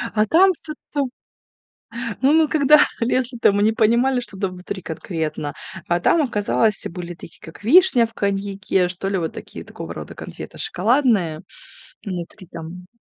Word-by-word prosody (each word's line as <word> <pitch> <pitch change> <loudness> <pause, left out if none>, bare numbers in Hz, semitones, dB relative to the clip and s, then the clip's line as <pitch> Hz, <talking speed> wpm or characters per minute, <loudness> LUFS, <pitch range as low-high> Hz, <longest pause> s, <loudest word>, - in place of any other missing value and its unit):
А 215 0 +4
там 355 - +5
чёт 305 -1 -7 0.2
там. 280 -3 0 1.1
Ну, 270 +3 +4
мы 320 0 +5
когда 300 0 +5
лезли, 245 +1 0
то 230 - +4
мы 205 +1 +1
не 220 - +4
понимали, 240 +4 +3
что 225 -5 -8
там 195 -2 -1
внутри 185 +1 -7
конкретно. 160 -3 -4 0.3
А 175 0 +1
там 325 - +3
оказалось 215 -4 +1
были 175 0 -7
такие, 165 0 -13
как 165 +5 -12
вишня 285 - +6
в 225 - -12
коньяке, 195 -2 0
что 185 +2 -5
ли 195 0 0
вот 165 -3 -3
такие, - - -9
такого - - -8
рода - - -8
конфеты - - -9
шоколадные 205 - +1 0.6
внутри 185 0 -6
там. 170 +2 -9
205 Hz, 160 wpm, -21 LUFS, 180-255 Hz, 1.1 s, вишня